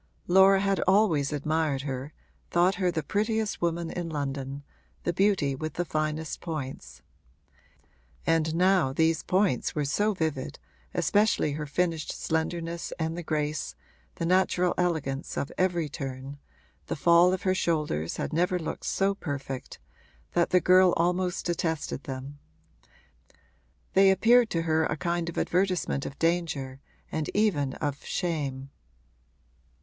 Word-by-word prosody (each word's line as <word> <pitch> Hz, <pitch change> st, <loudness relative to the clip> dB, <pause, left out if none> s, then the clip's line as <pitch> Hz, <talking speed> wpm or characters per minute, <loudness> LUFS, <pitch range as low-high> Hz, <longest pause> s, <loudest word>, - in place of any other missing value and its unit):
Laura 190 Hz, +2 st, +6 dB
had 195 Hz, -2 st, +1 dB
always 185 Hz, -8 st, +3 dB
admired 150 Hz, -1 st, 0 dB
her, 135 Hz, 0 st, -4 dB, 0.4 s
thought 175 Hz, +2 st, +3 dB
her 180 Hz, -, +3 dB
the 165 Hz, -3 st, -2 dB
prettiest 215 Hz, +1 st, -1 dB
woman 170 Hz, -1 st, -1 dB
in 175 Hz, -2 st, -4 dB
London, 140 Hz, -2 st, -4 dB, 0.4 s
the 175 Hz, -, 0 dB
beauty 190 Hz, -7 st, +2 dB
with 155 Hz, +3 st, -5 dB
the 175 Hz, -, -1 dB
finest 155 Hz, 0 st, -2 dB
points; 155 Hz, -6 st, -6 dB, 1.2 s
and 160 Hz, -1 st, +1 dB
now 180 Hz, -5 st, +3 dB
these 160 Hz, +3 st, +2 dB
points 185 Hz, -, +1 dB
were 150 Hz, -2 st, 0 dB
so 205 Hz, +10 st, +1 dB
vivid 155 Hz, -6 st, -2 dB, 0.4 s
(especially 205 Hz, -7 st, +2 dB
her 150 Hz, +1 st, -4 dB
finished 165 Hz, 0 st, -1 dB
slenderness 165 Hz, +1 st, -3 dB
and 160 Hz, 0 st, -2 dB
the 175 Hz, -, -4 dB
grace, 150 Hz, -2 st, -2 dB, 0.4 s
the 165 Hz, -, -3 dB
natural 180 Hz, 0 st, +2 dB
elegance 160 Hz, -6 st, -2 dB
of 140 Hz, -, -2 dB
every 175 Hz, -3 st, +1 dB
turn 135 Hz, -1 st, -6 dB, 0.5 s
the -, -, -2 dB
fall 170 Hz, +3 st, +5 dB
of 185 Hz, -, -2 dB
her 185 Hz, -, +2 dB
shoulders 150 Hz, -, -1 dB
had -, -, -3 dB
never 180 Hz, +3 st, +2 dB
looked 165 Hz, -, -5 dB
so 195 Hz, +1 st, +1 dB
perfect) 140 Hz, -8 st, -6 dB, 0.5 s
that 170 Hz, -, +2 dB
the 180 Hz, -, +5 dB
girl 185 Hz, 0 st, +5 dB
almost 180 Hz, +1 st, 0 dB
detested 160 Hz, -4 st, -2 dB
them: 135 Hz, +2 st, -7 dB, 1.5 s
they 195 Hz, 0 st, +6 dB
appeared 225 Hz, +5 st, +5 dB
to 165 Hz, -1 st, -1 dB
her 160 Hz, -1 st, +2 dB
a 155 Hz, -, -2 dB
kind 170 Hz, +3 st, -1 dB
of 170 Hz, -, -8 dB
advertisement 180 Hz, -6 st, 0 dB
of 140 Hz, -, -9 dB
danger 155 Hz, -6 st, -1 dB, 0.3 s
and 155 Hz, -1 st, -2 dB
even 160 Hz, -11 st, +2 dB
of 145 Hz, -1 st, -3 dB
shame. 140 Hz, -6 st, -3 dB
165 Hz, 135 wpm, -27 LUFS, 145-180 Hz, 1.5 s, Laura